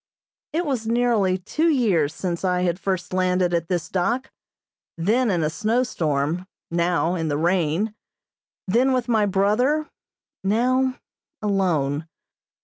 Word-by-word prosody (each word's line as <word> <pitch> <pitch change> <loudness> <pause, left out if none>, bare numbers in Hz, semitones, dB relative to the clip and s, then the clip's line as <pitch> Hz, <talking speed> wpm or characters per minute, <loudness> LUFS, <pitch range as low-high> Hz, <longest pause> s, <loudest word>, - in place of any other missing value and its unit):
It 335 +3 -1
was 255 -7 -2
nearly 230 -5 +2
two 310 - 0
years 200 - +2
since 175 -2 -3
I 180 -1 +1
had 175 0 0
first 185 -2 -2
landed 180 -1 +1
at 170 -1 0
this 175 -3 -1
dock, 235 +8 -1 0.7
then 220 +9 +2
in 175 -5 +1
a 155 - +1
snow 220 +8 +1
storm, 160 - -1 0.2
now 170 0 +1
in 165 -3 -2
the 145 -1 0
rain, 175 +4 +1 0.7
then 250 +7 +3
with 250 -1 0
my 220 -3 +2
brother, 225 +11 +1 0.5
now 255 +5 +2 0.5
alone. 165 -7 0
190 Hz, 135 wpm, -23 LUFS, 170-235 Hz, 0.7 s, then